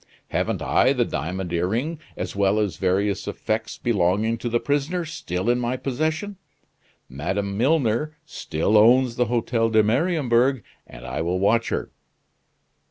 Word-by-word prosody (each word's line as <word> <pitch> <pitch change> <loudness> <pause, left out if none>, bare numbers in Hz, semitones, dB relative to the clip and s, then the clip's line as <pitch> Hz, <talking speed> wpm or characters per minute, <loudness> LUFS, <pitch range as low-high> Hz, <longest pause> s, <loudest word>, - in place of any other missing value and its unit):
Haven't - - -1
I - - +3
the - - +1
diamond 90 +4 -4
earring, 115 - -1 0.2
as - - -4
well 100 +1 +2
as 100 -6 -1
various 95 +2 0
effects 110 +1 -3
belonging 110 +1 +1
to 120 - -3
the 120 +1 +1
prisoner, 145 +6 -1
still 95 - -4
in 120 +1 +3
my 125 +1 -1
possession? 155 +10 -2 0.7
Madame 95 +9 -3
Milner 140 +3 +1
still 100 +7 +1
owns 120 +2 +5
the 125 - +2
Hotel 115 0 0
de 110 -1 +4
Mariembourg, 130 - +2 0.2
and - - -12
I 65 - -3
will 85 +3 0
watch 110 +5 +2
her." - - -3
115 Hz, 145 wpm, -23 LUFS, 100-130 Hz, 0.7 s, owns